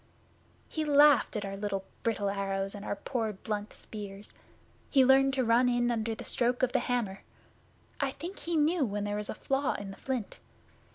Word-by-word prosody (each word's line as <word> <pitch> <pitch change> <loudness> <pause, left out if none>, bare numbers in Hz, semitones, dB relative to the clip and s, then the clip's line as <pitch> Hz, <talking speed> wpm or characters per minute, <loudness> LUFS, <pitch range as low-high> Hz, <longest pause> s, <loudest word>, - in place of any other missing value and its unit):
'He 315 - -2
laughed 290 -3 +5
at 210 -1 -2
our 195 0 -4
little 195 -1 -3 0.2
brittle 205 -3 0
arrows 195 0 -2
and 205 -1 -8
our - - -2
poor 225 0 -2
blunt 210 +1 -4
spears. 205 -1 -8 0.6
He 270 -3 +5
learned 270 +1 +5
to 260 - +2
run 240 +2 +4
in 240 0 +2
under 225 -1 -1
the - - -8
stroke 245 +1 +1
of 255 - +3
the 260 - +2
hammer. 225 -6 -2 0.8
I 275 - +1
think 340 +8 -7
he 340 -1 -1
knew 310 +2 +3
when 205 -4 -2
there 205 0 -2
was 210 0 -4
a - - -3
flaw 270 +3 0
in 200 -1 -6
the 195 - -11
flint. 255 -6 -4
230 Hz, 190 wpm, -30 LUFS, 205-270 Hz, 0.8 s, laughed